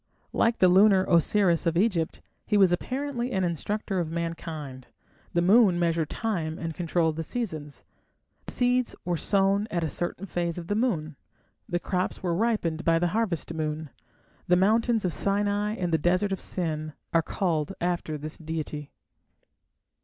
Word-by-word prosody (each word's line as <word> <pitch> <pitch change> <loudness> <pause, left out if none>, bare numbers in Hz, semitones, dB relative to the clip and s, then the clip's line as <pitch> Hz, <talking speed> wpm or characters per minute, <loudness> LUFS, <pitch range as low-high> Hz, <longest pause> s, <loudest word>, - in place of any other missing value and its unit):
Like 230 0 +2
the 185 - +5
lunar 190 +1 +5
Osiris 170 0 +3
of 165 0 +1
Egypt, 180 -5 +1 0.3
he 210 - +3
was 190 -3 +5
apparently 255 +5 -2
an 190 -1 0
instructor 190 +3 -1
of 170 -3 -2
mankind; 160 -5 -5 0.5
the 170 - +3
moon 195 -1 +5
measured 165 -2 +1
time 170 -8 -2
and 165 -1 -4
controlled 165 -1 0
the 165 - -2
seasons; 160 - -5 0.6
seeds 250 0 +1
were 175 0 0
sown 200 +4 +2
at 170 -4 -1
a 160 - -1
certain 175 +2 -2
phase 175 -3 -2
of 175 - -5
the - - +2
moon, 160 - -1 0.5
and 175 0 -1
crops 185 0 -2
were 175 -2 0
ripened 175 -5 0
by 165 0 +3
the 175 +1 +1
harvest 185 -8 -1
moon. 155 -2 -3 0.6
The 180 - +5
mountains 220 +3 +2
of 175 - 0
Sinai 205 +1 0
and 175 -5 -2
the 160 - +3
desert 180 +5 +1
of 190 - -1
Sin 155 -4 -2 0.2
are 165 - +5
called 165 -1 -1
after 175 -3 -1
this 155 +1 -7
deity. 155 -2 -5
175 Hz, 160 wpm, -27 LUFS, 160-205 Hz, 0.6 s, the